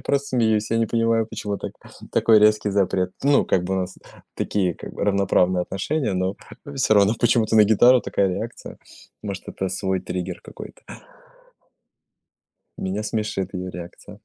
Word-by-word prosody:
просто 140 0 -1
смеюсь, 110 -4 +1
я 115 - +2
не 115 - +2
понимаю, 115 0 +1
почему 105 -2 -4
та- - - -5 0.4
такой 110 -1 +5
резкий 105 0 +3
запрет. 95 -2 +1
Ну, 140 0 +4
как 90 - +1
бы, 95 - -1
у 95 - 0
нас 90 0 -6 0.4
такие, 95 -4 -1
как - - -10
бы, - - -2
равноправные 95 -2 +2
отношения, 110 - -2
но, 95 +1 -1 0.3
э, 145 - -8
всё 130 -5 +3
равно 100 +1 +4
почему-то 115 -2 +3
на 110 - +8
гитару 120 +4 +5
такая 100 -4 0
реакция. 90 - -6 0.5
Может, 100 -2 -6
это 95 - -3
свой 95 0 -2
триггер 90 0 -5
какой-то. - - -12 1.9
Меня 95 +3 -3
смешит 105 -3 -3
её 90 0 -4
реакция. 90 -1 -10
100 Hz, 160 wpm, -23 LUFS, 95-115 Hz, 1.9 s, на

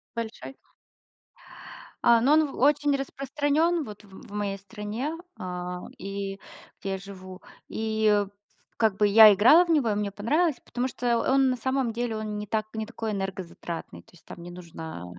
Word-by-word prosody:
Большой? 230 +3 -6 1.5
А, 235 -1 +6
ну, 280 +4 +4
он 310 -1 +4
очень 290 +1 +3
распространён, 290 +4 0
вот, 210 -1 -10
в 195 - -19
м - - -12
в - - -14
моей 205 -1 -2
стране, 210 +8 -5 0.3
а, 180 0 -5 0.2
и 195 0 -5 0.4
где 195 - -3
я 190 - -2
живу. 185 -1 -11 0.3
И, 220 0 -1
ф 205 -1 +3 0.5
как 220 -4 +2
бы 210 0 +3
я 215 0 +9
играла 300 - +6
в - - -15
него, 290 -9 +3
и 210 - +1
мне 205 -1 -1
понравилось, 290 - +1
потому 250 +1 -2
что 240 -2 0
он 265 +1 +3
на 255 - 0
самом 260 -1 0
деле, 235 -1 -2
он 215 -1 -4
не 210 - -5
так 215 +1 -1
не 220 0 -3
такой 225 -1 -5
энергозатратный. 185 - -5
То - - -24
есть 175 - -20
там 170 - -10
не 175 - -8
нужно 165 - -8
215 Hz, 180 wpm, -27 LUFS, 195-260 Hz, 1.5 s, я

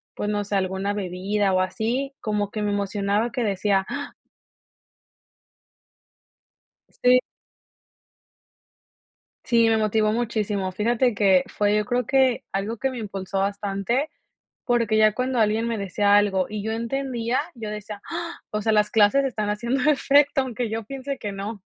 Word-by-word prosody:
pues 205 - -3
no 205 -1 0
sé, 205 0 -3
alguna 190 +1 -1
bebida 195 +1 -1
o 185 - +3
así, 230 +9 -2
como 210 -2 -1
que 215 - -4
me 205 0 0
emocionaba 205 +2 0
que 245 -2 -2
decía, 195 -1 +1
"Ah" 285 0 -5 2.9
Sí. 250 0 +6 2.3
Sí, 230 -2 +4
me 225 - +3
motivó 215 0 +2
muchísimo. 210 -4 -1
Fíjate 235 +4 +1
que 195 -3 +4
fue 205 0 +1
yo 210 - +1
creo 245 +1 -1
que, 265 -3 +2
algo 210 +3 -3
que 270 - 0
me 255 - -7
impulsó 195 -2 -4
bastante, 200 +7 -1 0.6
porque 230 -3 +2
ya 215 -1 +5
cuando 255 -1 -1
alguien 220 +1 +2
me 230 -2 -2
decía 200 +1 +2
algo 195 -3 +3
y 210 -1 -4
yo 220 +1 -2
entendía, 240 0 -1
yo 220 -3 -6
decía; 210 -1 -7
"Ah, 335 0 -5
o 210 - -2
sea, 220 +1 +1
las 210 -1 +3
clases 220 +6 +4
están 215 -5 -2
haciendo 240 +7 +1
efecto 280 -1 +3
aunque 245 -2 -3
yo 225 0 -4
piense 275 +2 -5
que 205 -4 -5
no". 200 +1 -6
215 Hz, 150 wpm, -24 LUFS, 200-240 Hz, 2.9 s, Sí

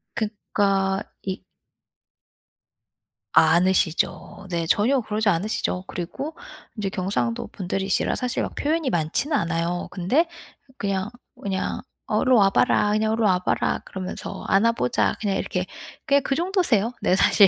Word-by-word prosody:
그러니까 200 -3 0 0.2
이 190 -1 -4 1.9
않으시죠. 180 +2 +2
네. 170 -2 -1
전혀 245 +10 +3
그러지 215 -1 0
않으시죠. 185 0 -1
그리고 270 - -5 0.4
인제 200 -2 -1
경상도 180 - -1
분들이시라 195 +1 -1
사실 250 -1 -1
막 - - -4
표현이 310 -1 0
많지는 175 - 0
않아요. 170 -2 -1
근데 250 - +2 0.5
그냥 195 0 -1 0.3
그냥 190 -1 -2 0.3
어 - - +1
"일로 255 -1 +4
와 195 -1 +6
봐라. 205 +1 +3
그냥 215 +1 +2
일로 225 0 0
와 185 -3 +4
봐라." 180 - 0
그러면서 185 -1 -6
"안아보자." 195 - +2
그냥 195 -3 0
이렇게 180 0 -2 0.4
그냥 280 0 +4
그 270 - 0
정도세요, 335 - +1
네 185 - +3
사실. 200 +1 +6
195 Hz, 295 characters per minute, -24 LUFS, 180-225 Hz, 1.9 s, 와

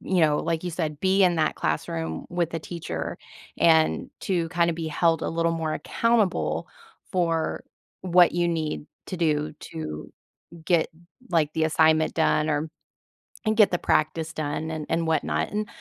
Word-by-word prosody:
you 185 -3 +1
know, 150 -1 +3
like 165 0 -2
you 180 - -2
said, 155 -3 -3
be 190 +2 +3
in 180 -2 +4
that 155 -1 +1
classroom, 80 -1 -2
with 170 -2 -1
a - - 0
teacher, 155 - -5 0.4
and 160 -1 +3
to 170 -4 -1
kinda 170 0 +2
be 165 0 -4
held 165 +1 +2
a - - -2
little 165 0 0
more 160 -2 -2
accountable 185 - 0 0.5
for 165 -3 0 0.4
what 180 -1 +5
you 175 0 +1
need 155 -3 -2 0.2
to 185 - -4
do 150 -3 +1
to 75 -1 -7 0.6
get, 170 -2 +3 0.4
like, 155 -4 +1
the 160 - +1
assignment 160 0 +3
done 155 -1 +2
or 150 +1 -1 0.8
and 215 0 +1
get 210 -4 +6
the 175 - +2
practice 155 +1 0
done 155 +1 -3
and 155 -2 -4
and 165 0 0
whatnot. 160 - 0
And, 210 0 -2
160 Hz, 165 wpm, -25 LUFS, 155-175 Hz, 0.8 s, get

